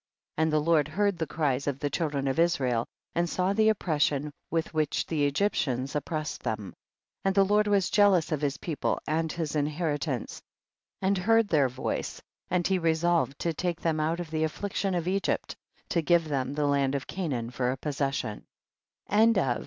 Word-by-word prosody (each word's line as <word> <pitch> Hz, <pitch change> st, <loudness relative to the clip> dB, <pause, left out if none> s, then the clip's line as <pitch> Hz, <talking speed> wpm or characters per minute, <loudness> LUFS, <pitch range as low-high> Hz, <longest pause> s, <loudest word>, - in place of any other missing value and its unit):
15. -, -, +1 dB
And 160 Hz, -, +1 dB
the 155 Hz, -, +4 dB
Lord 150 Hz, -1 st, +3 dB
heard 195 Hz, +3 st, 0 dB
the 160 Hz, -, -1 dB
cries 140 Hz, -3 st, -1 dB
of 140 Hz, -2 st, 0 dB
the 145 Hz, 0 st, -2 dB
children 145 Hz, -3 st, -1 dB
of 135 Hz, +3 st, 0 dB
Israel, 130 Hz, -9 st, +2 dB, 0.3 s
and 170 Hz, 0 st, 0 dB
saw 185 Hz, +3 st, +1 dB
the 220 Hz, +1 st, +4 dB
oppression 150 Hz, -7 st, +1 dB, 0.2 s
with 165 Hz, 0 st, -1 dB
which 155 Hz, -2 st, 0 dB
the 150 Hz, -3 st, 0 dB
Egyptians 140 Hz, -5 st, 0 dB
oppressed 155 Hz, 0 st, -3 dB
them. 105 Hz, -3 st, -3 dB
16. -, -, -15 dB, 0.5 s
And 195 Hz, 0 st, +2 dB
the 195 Hz, -1 st, +5 dB
Lord 210 Hz, +1 st, +3 dB
was 200 Hz, -3 st, +2 dB
jealous 200 Hz, -6 st, +4 dB
of 155 Hz, -2 st, -1 dB
his 140 Hz, -2 st, 0 dB
people 160 Hz, -4 st, -2 dB
and 160 Hz, +1 st, 0 dB
his 160 Hz, -3 st, -3 dB
inheritance,* 150 Hz, -3 st, -2 dB, 0.6 s
and 190 Hz, 0 st, +2 dB
heard 225 Hz, +2 st, +3 dB
their 145 Hz, -5 st, +3 dB
voice, 130 Hz, +1 st, -3 dB, 0.3 s
and 180 Hz, -1 st, +1 dB
he 190 Hz, -1 st, +2 dB
resolved 165 Hz, -3 st, +1 dB
to 170 Hz, -, 0 dB
take 175 Hz, +1 st, -2 dB
them 160 Hz, -2 st, 0 dB
out 160 Hz, +3 st, 0 dB
of 170 Hz, -3 st, -6 dB
the 155 Hz, -1 st, -1 dB
aflSiction 195 Hz, +3 st, -1 dB
of 170 Hz, 0 st, -3 dB
Egypt, 195 Hz, +1 st, -1 dB, 0.3 s
to 170 Hz, -, +1 dB
give 170 Hz, 0 st, +3 dB
them 135 Hz, -2 st, -1 dB
the 150 Hz, 0 st, +1 dB
land 140 Hz, -1 st, +2 dB
of 140 Hz, -, -3 dB
Ca 185 Hz, -2 st, -4 dB
naan 120 Hz, -4 st, -3 dB
for 125 Hz, 0 st, 0 dB
a 130 Hz, -, -1 dB
possession. 135 Hz, -6 st, -3 dB
155 Hz, 185 wpm, -28 LUFS, 140-175 Hz, 0.6 s, the